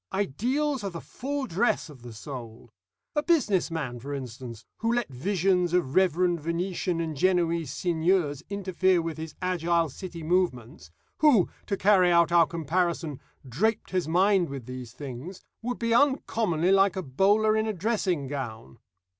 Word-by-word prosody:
Ideals 250 - -1
are 200 - -2
the 170 -2 -7
full 280 +7 -4
dress 230 0 0
of 145 -5 -14
the 120 0 -9
soul. 115 -1 -9 0.4
A 295 - +3
business 265 - +2
man, 140 -7 -4
for 140 +4 -5
instance, 120 -3 -8
who 230 +1 0
let 240 -2 0
visions 180 +5 0
of 155 -7 0
reverend 180 -1 +2
Venetian 170 +2 -2
and 160 -2 -3
Genoese 170 -2 +1
seigniors 165 -3 0
interfere 190 -2 +1
with 165 -1 -4
his 160 -1 -7
agile 170 -2 +1
City 170 +2 -8
movements 155 - -1 0.3
who, 280 - +5 0.2
to 200 - -1
carry 190 -2 +4
out 170 0 +4
our 170 -2 +5
comparison, 165 -2 -1 0.3
draped 205 - -1
his 185 -4 0
mind 185 +1 +3
with 135 -4 -7
these 125 -2 -7
things 140 +7 -8 0.2
would 245 +2 -3
be 230 -1 0
uncommonly 225 - +2
like 195 -1 +4
a 190 - -3
bowler 205 +10 +3
in 220 0 +1
a 215 - -1
dressing 185 -6 -1
gown. 120 - -6
175 Hz, 155 wpm, -27 LUFS, 145-200 Hz, 0.4 s, who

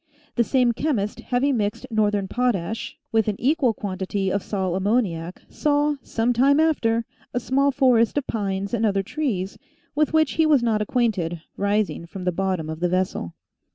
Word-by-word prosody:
The 235 - +3
same 250 0 +3
chemist, 235 -5 -1
having 260 +1 +1
mixed 205 -1 -2
northern 210 -2 +1
potash 225 -3 -1
with 220 -1 +2
an 210 - 0
equal 275 -1 +2
quantity 190 0 -2
of 200 - 0
sal 190 -3 -2
ammoniac, 190 -4 -1
saw, 295 0 +1
some 235 +2 0
time 275 +5 +4
after, 235 -8 +2 0.3
a - - +2
small 275 +3 +2
forest 255 -3 +3
of 285 - 0
pines 200 -2 -2
and 230 -2 0
other 200 -3 +2
trees, 200 -7 -3 0.3
with 305 0 +1
which 315 -2 +3
he 320 -1 +2
was 290 -5 +4
not 220 -2 +1
acquainted, 200 -8 0
rising 200 -4 0
from 185 +2 -8
the 180 - +1
bottom 185 -3 -1
of 160 0 -5
the 175 0 +1
vessel. 185 - -1
220 Hz, 170 wpm, -23 LUFS, 190-255 Hz, 0.3 s, time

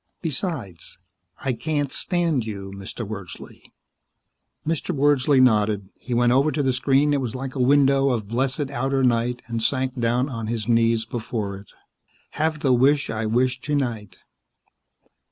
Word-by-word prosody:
" - - -52
besides, 140 - -3 0.5
I 130 - +1
can't 145 +1 -2
stand 170 -8 +1
you, 100 -3 -6
Mr. 100 +3 -7
Wordsley." 100 -4 -9 1.0
Mr. 160 -1 -2
Wordsley 140 -1 +3
nodded. 105 -5 +3
He 120 - -4
went 120 0 +3
over 140 +4 +3
to 150 - -1
the 130 -1 +1
screen 135 +3 +2
that 145 - +2
was 125 -2 -4
like 130 0 -5
a 135 - -5
window 135 +1 +4
of 115 -5 -1
blessed 130 +4 -1
outer 135 +1 0
night 120 0 +1
and 115 -1 -3
sank 130 +2 0
down 120 +3 +1
on 115 -5 -5
his 115 -1 -3
knees 115 -1 +2
before 110 -3 -4
it. 100 - -14 0.7
_Have 155 0 0
the 135 -3 +3
wish 140 +4 +3
I 110 0 -2
wish 125 +3 +1
tonight. 120 -10 -2
125 Hz, 155 wpm, -23 LUFS, 115-140 Hz, 1.0 s, window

